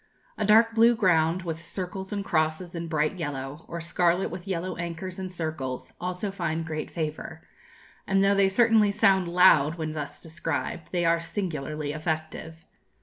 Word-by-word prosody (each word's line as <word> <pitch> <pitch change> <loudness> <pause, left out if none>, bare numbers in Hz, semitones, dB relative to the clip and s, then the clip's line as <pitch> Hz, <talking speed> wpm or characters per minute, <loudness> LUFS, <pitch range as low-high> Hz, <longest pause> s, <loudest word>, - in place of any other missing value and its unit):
A 210 - -1
dark 225 +2 +6
blue 230 +1 +5
ground 175 -3 +2
with 165 -1 -5
circles 190 +1 -5
and 200 -1 -3
crosses 160 +2 0
in 170 -1 -4
bright 155 +3 0
yellow, 145 -1 -5
or 170 - -5
scarlet 175 +2 +1
with 180 +2 -8
yellow 185 -1 -2
anchors 175 +2 -5
and 185 -1 -5
circles, 155 -7 -4
also 180 +3 -3
find 165 -4 -2
great 155 -1 -4
favour; 155 -2 -5 0.6
and 195 0 +3
though 200 0 +4
they 200 -1 +4
certainly 220 0 +4
sound 195 -3 +3
'loud' 170 -4 +5
when 160 -2 -3
thus 150 -2 -6
described, 165 0 -4
they 175 -2 0
are 165 0 +3
singularly 155 -5 -3
effective. 160 +1 -4
170 Hz, 160 wpm, -27 LUFS, 155-190 Hz, 0.6 s, dark